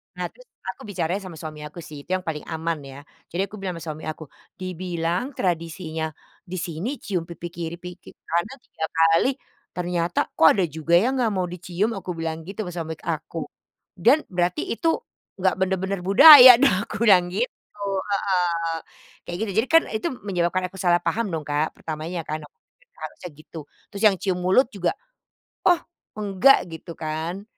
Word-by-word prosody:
Nah -, -, -3 dB
terus -, -, -19 dB
kan -, -, -18 dB
aku -, -, -15 dB
bicara 175 Hz, -5 st, -2 dB
sama 185 Hz, -4 st, -9 dB
suami 155 Hz, -2 st, -7 dB
aku 150 Hz, +3 st, -11 dB
sih 155 Hz, -3 st, -10 dB
itu 140 Hz, -, -24 dB
yang 185 Hz, -, -4 dB
paling 160 Hz, -3 st, -4 dB
aman 165 Hz, 0 st, -2 dB
ya, 135 Hz, -, -11 dB, 0.3 s
jadi 175 Hz, -, -1 dB
aku -, -, -8 dB
bilang 190 Hz, -2 st, -4 dB
sama 165 Hz, -, -8 dB
suami 155 Hz, +1 st, -10 dB
aku, 155 Hz, 0 st, -5 dB, 0.4 s
"Dibilang 180 Hz, -1 st, -2 dB
tradisinya 165 Hz, -2 st, -2 dB, 0.4 s
di 180 Hz, -, -6 dB
sini 170 Hz, +6 st, -4 dB
cium 180 Hz, -5 st, -2 dB
pipi 170 Hz, 0 st, -7 dB
kiri, 170 Hz, -1 st, -5 dB
pipi 180 Hz, 0 st, -11 dB, 0.2 s
kanan 170 Hz, +10 st, -1 dB
3 160 Hz, -, -5 dB
kali 165 Hz, +7 st, +4 dB, 0.5 s
ternyata 175 Hz, -1 st, -1 dB
kok 160 Hz, -, +5 dB
ada 195 Hz, -, +2 dB
juga 160 Hz, +2 st, +2 dB
yang 250 Hz, +9 st, +3 dB
enggak 230 Hz, -3 st, +2 dB
mau 185 Hz, -1 st, 0 dB
dicium?" 180 Hz, +4 st, -2 dB
Aku 185 Hz, -, -6 dB
bilang 165 Hz, -1 st, -3 dB
gitu 200 Hz, +3 st, -4 dB
sama 180 Hz, -, -6 dB
suami 160 Hz, -2 st, -4 dB
aku, 165 Hz, 0 st, -4 dB, 0.6 s
"dan 240 Hz, -, +6 dB
berarti 175 Hz, 0 st, 0 dB
itu 330 Hz, +8 st, -1 dB, 0.5 s
enggak 190 Hz, 0 st, +1 dB
bener-bener 190 Hz, +1 st, 0 dB
budaya 255 Hz, +3 st, +11 dB
dong," 280 Hz, -8 st, +5 dB
aku -, -, -3 dB
bilang 185 Hz, -5 st, +6 dB
gitu, 205 Hz, +1 st, -5 dB, 0.3 s
heeh, 175 Hz, -4 st, 0 dB, 0.5 s
kayak 175 Hz, -, -4 dB
gitu. 215 Hz, -, -3 dB
Jadi 235 Hz, -, +1 dB
kan 330 Hz, -, +7 dB
itu 220 Hz, +9 st, -2 dB, 0.2 s
menyebabkan 185 Hz, -2 st, 0 dB
aku 190 Hz, -, -12 dB
salah 175 Hz, -2 st, +2 dB
paham 210 Hz, +7 st, 0 dB
dong, 165 Hz, -5 st, -3 dB
Kak, 150 Hz, +2 st, -1 dB
pertamanya 160 Hz, +2 st, -5 dB
kan 155 Hz, 0 st, -4 dB
aku -, -, -49 dB, 0.5 s
harusnya 180 Hz, -, -7 dB
gitu, 155 Hz, +2 st, -13 dB, 0.3 s
terus 200 Hz, -, -7 dB
yang 200 Hz, -, +3 dB
cium 185 Hz, -1 st, -2 dB
mulut 190 Hz, +9 st, +3 dB
juga, 185 Hz, -4 st, -1 dB, 0.7 s
oh 355 Hz, -2 st, +5 dB, 0.4 s
enggak 210 Hz, +6 st, +5 dB
gitu 165 Hz, +1 st, -9 dB
kan 160 Hz, +4 st, -4 dB
180 Hz, 175 wpm, -24 LUFS, 165-195 Hz, 0.7 s, budaya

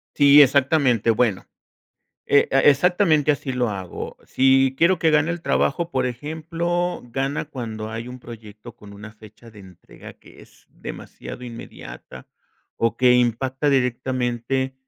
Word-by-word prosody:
Sí, 145 Hz, 0 st, +7 dB
exactamente. 130 Hz, -4 st, +2 dB
Bueno, 110 Hz, -4 st, +1 dB, 0.8 s
e 140 Hz, -, +3 dB
e 135 Hz, +2 st, +5 dB
exactamente 160 Hz, 0 st, +2 dB
así 140 Hz, -2 st, -2 dB
lo 125 Hz, -2 st, 0 dB
hago 95 Hz, -3 st, -7 dB
si 135 Hz, 0 st, +2 dB
quiero 170 Hz, +3 st, +3 dB
que 160 Hz, -1 st, +2 dB
gane 150 Hz, +2 st, +2 dB
el 170 Hz, 0 st, -5 dB
trabajo. 170 Hz, 0 st, -1 dB
Por -, -, 0 dB
ejemplo, 165 Hz, +6 st, -3 dB
gana 135 Hz, +4 st, -3 dB
cuando 115 Hz, -7 st, -7 dB
hay 115 Hz, +2 st, -6 dB
un 125 Hz, 0 st, -9 dB
proyecto 110 Hz, -1 st, -12 dB
con 100 Hz, -1 st, -15 dB
una 105 Hz, +2 st, -11 dB
fecha 110 Hz, +1 st, -16 dB
de 105 Hz, -, -14 dB
entrega 95 Hz, -3 st, -14 dB
que -, -, -18 dB
es -, -, -22 dB
demasiado 125 Hz, -, -10 dB
inmediata, 115 Hz, -, -11 dB, 0.5 s
o 115 Hz, 0 st, 0 dB
que 125 Hz, -1 st, +4 dB
impacta 130 Hz, +4 st, 0 dB
directamente 130 Hz, 0 st, -1 dB
130 Hz, 140 wpm, -22 LUFS, 115-145 Hz, 0.8 s, Sí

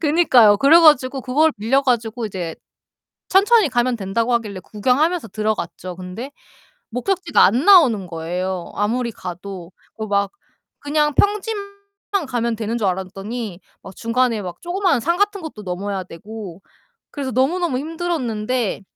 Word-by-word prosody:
그니까요. 275 Hz, -10 st, +5 dB
그래 290 Hz, +9 st, +6 dB
가지고 275 Hz, -4 st, +4 dB
그걸 295 Hz, +5 st, +2 dB
빌려 235 Hz, +6 st, +1 dB
가지고 235 Hz, -2 st, -1 dB
이제 180 Hz, -5 st, -5 dB, 0.7 s
천천히 405 Hz, 0 st, +4 dB
가면 245 Hz, 0 st, +1 dB
된다고 225 Hz, +4 st, -1 dB
하길래 215 Hz, -5 st, -2 dB
구경하면서 260 Hz, -, 0 dB
들어갔죠. 190 Hz, -4 st, -3 dB
근데 185 Hz, +9 st, -7 dB, 0.6 s
목적지가 355 Hz, -, +1 dB
안 235 Hz, +8 st, +2 dB
나오는 265 Hz, -, +6 dB
거예요 175 Hz, +2 st, -4 dB
아무리 235 Hz, +4 st, -1 dB
가도. 180 Hz, -2 st, -8 dB, 0.3 s
그 220 Hz, -, -4 dB
막 200 Hz, -1 st, 0 dB, 0.5 s
그냥 295 Hz, +1 st, 0 dB
평지만 410 Hz, 0 st, 0 dB, 0.6 s
가면 235 Hz, -3 st, -1 dB
되는 225 Hz, +1 st, -2 dB
줄 210 Hz, -4 st, 0 dB
알았더니 195 Hz, +2 st, -4 dB, 0.2 s
막 190 Hz, -, -11 dB
중간에 230 Hz, -1 st, 0 dB
막 180 Hz, -3 st, -7 dB
조그만한 355 Hz, -4 st, +1 dB
산 340 Hz, +9 st, 0 dB
같은 405 Hz, -1 st, 0 dB
것도 315 Hz, -10 st, -8 dB
넘어야 190 Hz, +1 st, -4 dB
되고 195 Hz, 0 st, -10 dB, 0.5 s
그래서 275 Hz, -3 st, -4 dB
너무너무 275 Hz, +4 st, +1 dB
힘들었는데 255 Hz, -, -2 dB
235 Hz, 325 characters per minute, -20 LUFS, 200-295 Hz, 0.7 s, 그래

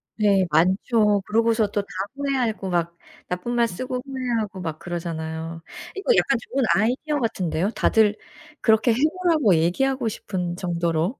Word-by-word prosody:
네. 200 Hz, -3 st, +3 dB
많죠. 200 Hz, +6 st, +3 dB
그러고서 225 Hz, 0 st, +2 dB
또 205 Hz, 0 st, -1 dB
다 200 Hz, -, -16 dB, 0.3 s
후회하고 255 Hz, -8 st, -1 dB
막 170 Hz, -1 st, -1 dB, 0.3 s
나쁜 180 Hz, +7 st, -3 dB
말 235 Hz, -1 st, +3 dB
쓰고 250 Hz, +5 st, -4 dB
후회하고 240 Hz, -7 st, -3 dB
막 160 Hz, -3 st, -4 dB
그러잖아요. 165 Hz, -1 st, -5 dB, 0.3 s
이거 410 Hz, +5 st, +2 dB
약간 275 Hz, -8 st, +3 dB
좋은 265 Hz, +2 st, -2 dB
아이디어 255 Hz, +8 st, 0 dB
같은데요. 190 Hz, -, -1 dB
다들 215 Hz, -2 st, +3 dB, 0.5 s
그렇게 220 Hz, +2 st, +4 dB
해 225 Hz, -, +1 dB, 0.3 s
보라고 305 Hz, -, +4 dB
얘기하고 240 Hz, +11 st, +1 dB
싶은 180 Hz, -5 st, -3 dB
정도로. 170 Hz, +3 st, -1 dB
210 Hz, 325 characters per minute, -23 LUFS, 175-245 Hz, 0.5 s, 그렇게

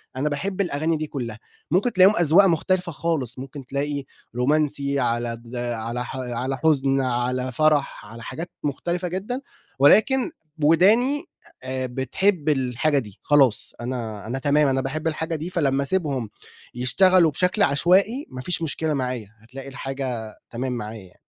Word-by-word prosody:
أنا 145 Hz, +3 st, 0 dB
باحب 190 Hz, +7 st, -2 dB
الأغاني 160 Hz, -2 st, 0 dB
دي 155 Hz, 0 st, -4 dB
كلّها 115 Hz, -6 st, -5 dB, 0.3 s
ممكن 200 Hz, +8 st, +2 dB
تلاقيهم 190 Hz, +3 st, +6 dB
أزواق 175 Hz, +4 st, +6 dB
مختلفة 180 Hz, +1 st, +1 dB
خالص، 140 Hz, -6 st, -2 dB
ممكن 135 Hz, 0 st, -8 dB
تلاقي 140 Hz, +1 st, -2 dB, 0.3 s
رومانسي 140 Hz, +1 st, +1 dB
على 120 Hz, -1 st, 0 dB
د 120 Hz, +2 st, -9 dB
على 120 Hz, 0 st, -3 dB
ح 130 Hz, -, -7 dB
على 125 Hz, +1 st, -3 dB
حزن 135 Hz, -2 st, +2 dB
على 125 Hz, 0 st, -1 dB
فرح 150 Hz, -4 st, +1 dB
على 115 Hz, +2 st, -11 dB
حاجات 170 Hz, +2 st, -6 dB
مختلفة 175 Hz, +5 st, -2 dB
جدًا 200 Hz, +9 st, -4 dB, 0.4 s
ولكن 240 Hz, -, +5 dB, 0.3 s
وداني 225 Hz, -, +4 dB, 0.4 s
آآ 130 Hz, 0 st, -3 dB
بتحب 145 Hz, -, 0 dB
الحاجة 135 Hz, +1 st, +1 dB
دي 105 Hz, -6 st, -10 dB
خلاص 135 Hz, -7 st, +3 dB
أنا 115 Hz, -4 st, -5 dB
أنا 130 Hz, +3 st, -3 dB
تمام 145 Hz, +1 st, +3 dB
أنا 135 Hz, -1 st, +1 dB
باحب 155 Hz, +5 st, -3 dB
الحاجة 160 Hz, +1 st, -2 dB
دي 160 Hz, +3 st, -4 dB
فلمّا 140 Hz, -6 st, +1 dB
اسيبهم 140 Hz, -, -1 dB, 0.5 s
يشتغلوا 170 Hz, +7 st, +4 dB
بشكل 180 Hz, +7 st, +1 dB
عشوائي 190 Hz, -, +3 dB
ما 130 Hz, -, -7 dB
فيش 175 Hz, +5 st, 0 dB
مشكلة 160 Hz, 0 st, -1 dB
معايا 125 Hz, -6 st, -3 dB
هتلاقي 130 Hz, +5 st, -10 dB
الحاجة 130 Hz, -5 st, -5 dB, 0.2 s
تمام 125 Hz, +2 st, -3 dB
معايا 110 Hz, -2 st, -6 dB
يعني. 90 Hz, -, -24 dB
140 Hz, 150 wpm, -23 LUFS, 125-170 Hz, 0.5 s, تلاقيهم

